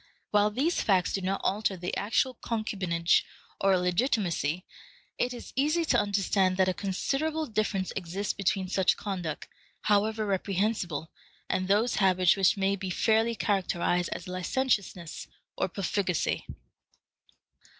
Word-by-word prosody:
While 210 0 +4
these 275 +11 0
facts 190 -3 +2
do 195 - -1
not 190 +1 -1
alter 200 -1 0
the 180 0 -3
actual 235 +5 +1
concubinage 195 -8 0 0.4
or 195 0 +3
illegitimacy, 180 - 0 0.5
it 250 - +1
is 245 - -9
easy 305 +5 +2
to - - +3
understand 195 -2 +1
that 190 -1 +3
a 185 - +2
considerable 285 - -1
difference 210 -5 -1
exists 195 +2 -2
between 195 -1 0
such 190 0 +2
conduct, 180 -7 -4 0.3
however 215 +1 +2
reprehensible, 190 -5 -1 0.4
and 185 - -1
those 210 +5 +2
habits 185 -3 +4
which 195 +1 +3
may 195 0 +1
be 190 -1 -5
fairly 225 +5 +2
characterized 180 -3 0
as 180 - -5
licentiousness 185 - -2 0.3
or - - 0
profligacy. 185 -2 -1
195 Hz, 130 wpm, -28 LUFS, 185-215 Hz, 0.5 s, While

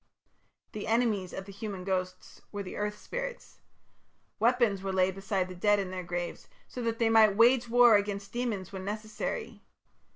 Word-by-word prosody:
The 215 - -6
enemies 220 -5 +1
of 195 - -6
the 200 - -10
human 200 -2 -6
ghosts 185 -1 -4
were 205 -1 -4
the 185 - -8
earth 210 0 -2
spirits. - - -6 0.8
Weapons 235 -4 +2
were 195 0 -3
laid 190 0 +2
beside 195 -1 -2
the 185 - -8
dead 205 +3 +3
in 195 -2 -3
their 185 0 -4
graves 175 0 -5 0.2
so 250 - -7
that 230 -1 -1
they 230 -1 +2
might 215 -3 +5
wage 240 +1 +5
war 240 -1 +7
against 200 -1 -4
demons 230 -7 -3
when 190 -1 -6
necessary. 215 - -5
205 Hz, 170 wpm, -30 LUFS, 190-230 Hz, 0.8 s, war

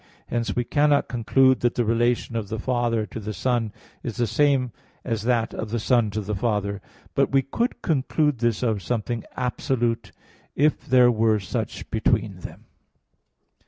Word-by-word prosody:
Hence, 120 0 -1
we 120 - +1
cannot 145 +3 +2
conclude 130 +2 +3
that 120 -1 +1
the 120 - +1
relation 120 +1 +1
of 110 -3 -3
the 110 - -3
father 120 -1 0
to 115 - -7
the 105 0 -5
son 120 -4 0 0.3
is 115 -4 -5
the 120 - +1
same 135 0 +2 0.3
as 115 -4 -1
that 120 -2 +1
of 110 - -4
the 120 - -1
son 120 -1 +2
to 105 +2 -3
the 105 +1 -4
father; 100 -1 -1 0.3
but - - +2
we 135 0 +3
could 235 - -2
conclude 150 -2 +1
this 120 0 0
of 110 -5 0
something 115 +3 -2
absolute, 120 -4 -1 0.4
if 150 +2 +1
there 125 -1 +6
were 110 -1 +2
such 95 -4 -4
between - - +1
them. - - -10
120 Hz, 165 wpm, -24 LUFS, 110-125 Hz, 0.4 s, there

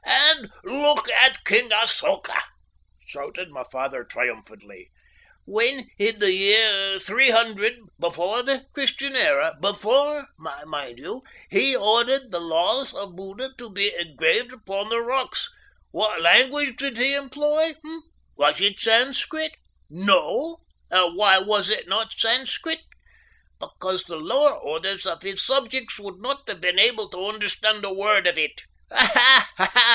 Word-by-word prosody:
"And 295 +4 +5
look 295 -4 0
at 265 0 +5
King 225 +4 +3
Asoka," 230 +7 0 0.6
shouted 185 - -10
my 130 -3 -10
father 135 +1 -6
triumphantly. 450 -4 -7 0.6
"When, 235 +4 0
in 215 +2 -1
the 205 -2 +1
year 195 0 +3
300 225 0 +2 0.2
before 175 +7 -3
the 270 +1 -3
Christian 275 0 -2
era 280 -5 +2
before, 270 +9 -1
mind 145 -4 -10
you 250 - -10 0.3
he 270 -1 +3
ordered 240 +4 +1
the 175 - -3
laws 170 +11 -2
of 195 -3 -9
Buddha 195 +8 -9
to 240 -1 -10
be 200 +1 0
engraved 170 - -1
upon 200 -3 -7
the 230 +1 -1
rocks, 260 - -4 0.4
what 215 -3 -2
language 265 - +4
did 275 -4 -5
he 260 +3 +3
employ, 295 +3 -1
eh? 325 +1 -10 0.4
Was - - +1
it 200 0 +1
Sanscrit? 265 +7 0 0.4
no! 280 - -1 0.3
And 180 -2 +2
why 195 -1 +5
was 200 +1 -1
it 215 - -1
not 220 +4 -2
Sanscrit? 265 +7 -1 0.8
Because 185 0 -6
the 170 -2 -9
lower 275 - +1
orders 190 - -4
of 165 -3 -5
his 195 0 -4
subjects 260 -3 -1
would 200 -2 -13
not 275 +5 -6
have 185 - -6
been 180 +1 +1
able 220 -1 +3
to 185 +1 -8
understand 215 0 -1
a 195 - -6
word 195 0 +1
of 175 -1 +1
it. 150 -1 -3 0.3
Ha, 260 +1 +8
ha! 190 +6 0
220 Hz, 140 wpm, -21 LUFS, 190-270 Hz, 0.8 s, Ha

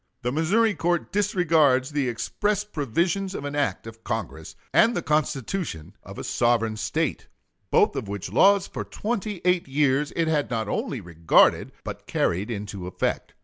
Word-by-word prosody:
The 125 - 0
Missouri 200 - +2
court 170 +1 -1
disregards 160 -9 +2
the 145 -3 0
express 205 - -1
provisions 175 - -1
of 140 - -5
an 145 0 -4
act 145 -5 -1
of 115 0 -11
Congress 105 -9 -5 0.2
and 235 +1 +5
the - - -2
Constitution 150 - -2
of - - -11
a - - -5
sovereign 115 -2 +1
State, - - -2 0.4
both - - +3
of - - -4
which 100 -1 -5
laws 200 - +5
for - - -5
twenty 210 -4 -4
eight 180 -3 +2
years 140 +1 +1
it 165 -1 +1
had 150 -2 +1
not 110 -3 -2
only 125 +3 -2
regarded, 85 -2 +3
but - - -7
carried 95 +6 0
into 100 -4 -5
effect. 90 - -3
145 Hz, 160 wpm, -25 LUFS, 115-180 Hz, 0.4 s, and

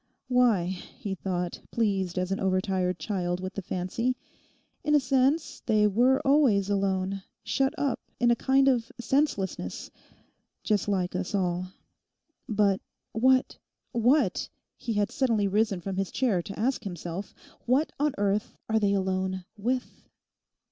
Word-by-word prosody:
Why, 245 -8 +4
he 190 +4 -5
thought, 180 -2 -3
pleased 195 -5 0
as 185 +1 -1
an 195 - 0
overtired 185 -1 0
child 180 -4 -2
with 185 +1 -5
the 200 - -4
fancy, 190 +8 -1 0.7
in 300 0 +3
a - - +7
sense 270 +4 +1
they 215 -2 +4
were 245 +6 +4
always 250 -9 +4
alone, 195 -1 0 0.2
shut 270 0 +1
up 280 -3 0 0.2
in 240 0 +4
a - - +4
kind 270 +3 +3
of 240 -4 +2
senselessness—just 210 - -3
like 185 -3 0
us 185 +3 -2
all. 180 -1 0 0.8
But 205 -3 +2 0.3
what—what, 255 +2 +1 0.3
he 230 - -4
had 205 -1 +1
suddenly 225 -6 +1
risen 205 -1 +1
from 190 +1 -4
his 195 -1 -1
chair 230 -9 +1
to 195 +4 -8
ask 250 +3 0
himself—what 195 - -3
on 295 -1 +2
earth 205 +1 0
are 220 0 +2
they 200 -2 +2
alone 190 -1 -1
with? 245 +5 -3
205 Hz, 135 wpm, -28 LUFS, 185-250 Hz, 0.8 s, a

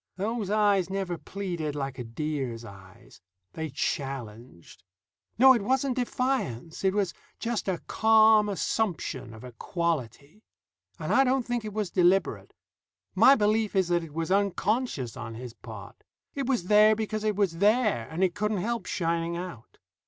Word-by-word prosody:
Those 210 +1 -2
eyes 205 -3 +2
never 190 -2 -2
pleaded 170 -5 -5
like 135 -2 -4
a - - -3
deer's 120 -1 -4
eyes. 100 +3 -15 0.3
They 160 -1 -4
challenged. 120 - -5 0.6
No, 265 +3 +8
it 235 - 0
wasn't 260 +4 0
defiance. 245 - -2
It 190 0 +2
was 200 -4 0 0.2
just 230 -3 -3
a 185 -2 0
calm 220 -1 +5
assumption 180 - -2
of 110 +1 -12
equality. 145 - -4 0.6
And - - -2
I 270 - +6
don't 260 -1 +1
think 240 -2 -2
it 215 -1 -6
was 210 -4 -2
deliberate. 185 +1 +2 0.6
My 275 - +7
belief 215 -1 +1
is 190 -2 +2
that 175 -1 +1
it 155 -2 -11
was 165 +2 -2
unconscious 200 - 0
on 115 -1 -7
his 120 0 -8
part. - - -11 0.3
It 275 -3 -3
was 250 -8 +1
there 210 +3 +5
because 215 0 -3
it 215 -1 0
was 190 -5 0
there, 210 - +2
and 170 +4 -1
it 180 -2 +2
couldn't 210 0 -1
help 225 +1 -2
shining 170 0 -1
out. 175 -10 -8
190 Hz, 155 wpm, -27 LUFS, 145-215 Hz, 0.6 s, No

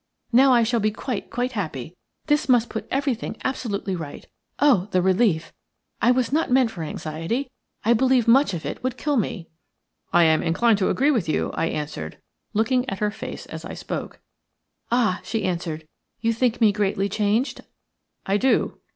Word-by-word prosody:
Now 260 +3 +6
I 240 -2 +5
shall 235 +1 +1
be 215 0 +2
quite, 220 +1 -5
quite 245 +1 -2
happy. 165 - -5 0.3
This 295 -1 +1
must 240 -2 +4
put 220 - -5
everything 265 -5 -2
absolutely 205 -7 -2
right. 160 -4 -7 0.3
Oh, 245 -10 +4
the 185 - +2
relief! 185 -2 +2 0.5
I 235 - +4
was 250 +1 +2
not 320 +2 +1
meant 250 -2 +3
for 170 - -7
anxiety; 165 - -3 0.3
I 235 - +5
believe 255 0 +3
much 245 -4 +5
of 160 - -6
it - - -5
would 255 -1 -2
kill 295 +1 0
me." 185 -7 -2 0.6
"I 175 - +5
am 160 -1 +4
inclined 205 +6 +2
to 190 - +2
agree 280 +3 +3
with 220 - 0
you," - - 0
I - - 0
answered, 150 - -5 0.4
looking 250 +4 +1
at 195 - -4
her 210 +1 0
face - - -7
as - - -8
I - - -7
spoke. - - -6 0.7
"Ah," 230 -6 +2
she 225 - -2
answered, 165 -3 -3 0.3
"you 230 0 +1
think 240 0 0
me 220 -3 +5
greatly 200 -1 0
changed?" 210 +5 0 0.6
"I 195 +1 +2
do." 260 +4 +1
220 Hz, 175 wpm, -23 LUFS, 185-250 Hz, 0.7 s, Now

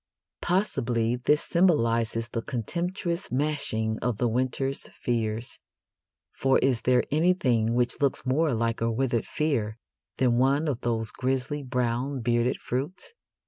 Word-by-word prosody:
Possibly 125 - +1
this 150 +4 +2
symbolises 115 -10 +2
the 115 - -3
contemptuous 170 - -3
smashing 125 -6 -1
of 120 -3 -1
the 120 - +1
winter's 130 +3 -1
fears, 115 -1 -2 0.7
for 135 0 +3
is 130 -3 +2
there 125 0 +3
anything 140 -9 +2
which 120 +2 +1
looks 140 -2 +1
more 140 +1 +2
like 115 0 -1
a 115 0 +1
withered 120 -1 0
fear 120 -9 -1 0.4
than 125 -2 +3
one 140 +4 +2
of 135 -4 -2
those 115 -2 -1
grisly 130 +3 -2
brown 125 +1 -1
bearded 120 +2 +1
fruits? 145 - -4
125 Hz, 130 wpm, -27 LUFS, 115-145 Hz, 0.7 s, for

